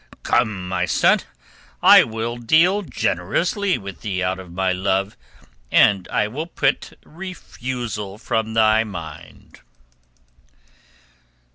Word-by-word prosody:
"Come, 110 Hz, -6 st, 0 dB
my 90 Hz, -1 st, -1 dB
son. -, -, +3 dB, 0.6 s
I -, -, +9 dB
will 115 Hz, +1 st, -4 dB
deal 165 Hz, -, +3 dB
generously 195 Hz, 0 st, -1 dB
with 100 Hz, -3 st, -9 dB
thee 95 Hz, -4 st, -2 dB
out 95 Hz, +1 st, -1 dB
of 90 Hz, -2 st, -11 dB
my 95 Hz, +1 st, 0 dB
love, 95 Hz, +2 st, -1 dB, 0.6 s
and 100 Hz, -3 st, +4 dB
I 105 Hz, -, 0 dB
will 150 Hz, +9 st, -5 dB
put -, -, 0 dB
thy -, -, -20 dB
refusal 125 Hz, -, -6 dB
from 110 Hz, 0 st, -2 dB
my 110 Hz, 0 st, +4 dB
mind." 85 Hz, -8 st, -10 dB
110 Hz, 115 wpm, -21 LUFS, 95-125 Hz, 0.6 s, I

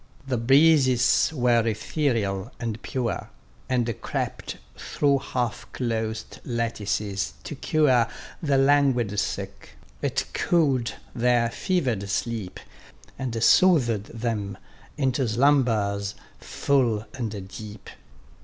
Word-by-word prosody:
The 125 Hz, -3 st, 0 dB
breezes 135 Hz, 0 st, +4 dB
were 120 Hz, -5 st, +2 dB
ethereal, 110 Hz, -4 st, -1 dB
and 115 Hz, -2 st, -4 dB
pure, 125 Hz, -3 st, -3 dB, 0.4 s
And 120 Hz, -3 st, -1 dB
crept -, -, -4 dB, 0.2 s
through 140 Hz, -2 st, +1 dB
half 120 Hz, -3 st, -3 dB
closed 110 Hz, -3 st, -3 dB
lattices 105 Hz, -, -2 dB
to -, -, -6 dB
cure 130 Hz, -7 st, +2 dB, 0.3 s
The 145 Hz, -4 st, +2 dB
languid 135 Hz, -7 st, +3 dB
sick; -, -, -5 dB, 0.2 s
it -, -, -1 dB
cool'd 140 Hz, -8 st, +1 dB, 0.2 s
their 120 Hz, -1 st, +2 dB
fever'd 125 Hz, -, -1 dB
sleep, 110 Hz, -2 st, -3 dB, 0.6 s
And 115 Hz, -4 st, -2 dB
soothed 120 Hz, -, +4 dB
them 110 Hz, -4 st, -3 dB, 0.4 s
into 130 Hz, -2 st, +1 dB
slumbers 110 Hz, -5 st, +2 dB, 0.2 s
full 120 Hz, -6 st, 0 dB
and 110 Hz, -6 st, -5 dB
deep. 105 Hz, +1 st, -10 dB
120 Hz, 100 wpm, -25 LUFS, 110-135 Hz, 0.6 s, breezes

